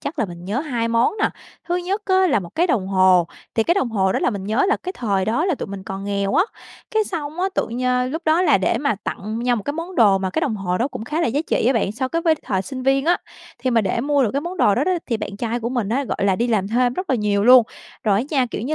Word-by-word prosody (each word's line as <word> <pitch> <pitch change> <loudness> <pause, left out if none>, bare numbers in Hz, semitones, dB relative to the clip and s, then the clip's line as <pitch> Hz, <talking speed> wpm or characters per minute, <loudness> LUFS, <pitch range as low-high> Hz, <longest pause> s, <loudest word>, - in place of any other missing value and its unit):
chắc 285 - -5
là 225 - +2
mình 175 -2 -9
nhớ 205 +8 -1
2 245 -7 -2
món 230 +7 +2
nè. - - +3 0.4
Thứ 350 - +1
nhất 380 +4 -2
á 375 -1 +3
là 215 - +2
một 175 - -8
cái 345 +2 +2
đồng 220 - 0
hồ. 185 -2 +4 0.3
Thì 225 - +3
cái 345 - +2
đồng 390 -11 0
hồ 190 -3 +1
đó - - 0
là - - +1
mình 200 -3 -5
nhớ 220 - +1
là - - +3
cái 370 - -4
thời 200 - -1
đó 235 +9 0
là 370 -3 +1
tụi - - -6
mình 195 -1 -7
còn 195 +1 -6
nghèo 200 -1 -1
á, 355 - +4 0.5
cái 440 -2 +1
xong 320 -3 -5
á 380 - +1
tự - - 0
nh 250 +1 0
lúc 320 +4 -4
đó 320 +3 +3
là 295 - +4
để 185 - +1
mà 280 -4 0
tặng 215 +3 -4
nhau 245 0 +1
một 210 - -4
cái 285 - -3
món 335 +4 -6
đồ 205 - +5
mà 190 -1 -2
cái 315 - -1
đồng 240 -9 -1
hồ 180 -2 -2
đó 245 - 0
cũng 220 - -7
khá 305 +7 -2
là - - +2
giá 270 +5 0
trị - - +1
á 255 - +4
bạn, 210 -5 0
so 255 +4 -2
cái 335 +3 -2
với 325 -1 +4
thời 190 -2 -1
sinh 260 +3 -6
viên 270 +1 +2
á. 350 +2 +3 0.4
Thì 255 +1 -1
mà 230 -2 +3
để 200 +3 -1
mua 285 +2 +2
được 225 - +1
cái 280 - 0
món 350 +3 -6
đồ 205 - +4
đó 275 - +1
đó 370 - +1
thì 235 - 0
bạn 205 -2 -6
trai 235 +2 -2
của 235 - -2
mình 240 -5 -2
á, 265 +6 0
gọi - - -4
là, 190 -2 +2
đi 235 - 0
làm 205 -4 0
thêm 245 +2 +2
rất 370 +2 -4
là 260 - +3
nhiều 205 -2 +1
luôn, 250 0 +8 0.4
rồi 205 -2 +3
á - - +1
nha, 265 -4 +2
kiểu 215 - -4
như 300 +5 -1
245 Hz, 315 wpm, -21 LUFS, 205-300 Hz, 0.5 s, luôn